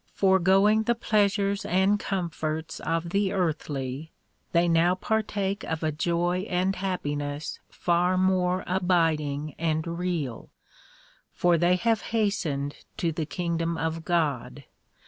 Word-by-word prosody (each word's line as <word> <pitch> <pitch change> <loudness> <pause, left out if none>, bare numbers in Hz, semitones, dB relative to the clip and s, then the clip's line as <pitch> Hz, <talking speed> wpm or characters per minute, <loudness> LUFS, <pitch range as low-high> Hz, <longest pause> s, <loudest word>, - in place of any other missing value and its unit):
Foregoing 195 +3 +4
the 235 - +2
pleasures 200 -2 +1
and 195 +2 +2
comforts 165 -4 -3
of 165 +1 -2
the 200 0 +1
earthly, 150 -5 -2 0.4
they 170 0 +3
now 170 +2 +3
par 220 +4 0
take 200 -1 -3
of 160 0 -3
a 155 - +1
joy 175 +5 0
and 185 +2 +1
happiness 145 -6 -3
far 180 +1 +1
more 185 -1 +2
abiding 160 -5 +1
and 160 -1 0
real; 170 -8 -3 0.8
for 175 -1 +2
they 175 +2 +3
have 225 +4 +1 0.2
hastened 160 -10 -1 0.2
to 170 - 0
the 160 -1 -3
kingdom 170 -1 -2
of 160 0 -2
God. 145 -6 -1
175 Hz, 125 wpm, -27 LUFS, 160-190 Hz, 0.8 s, Foregoing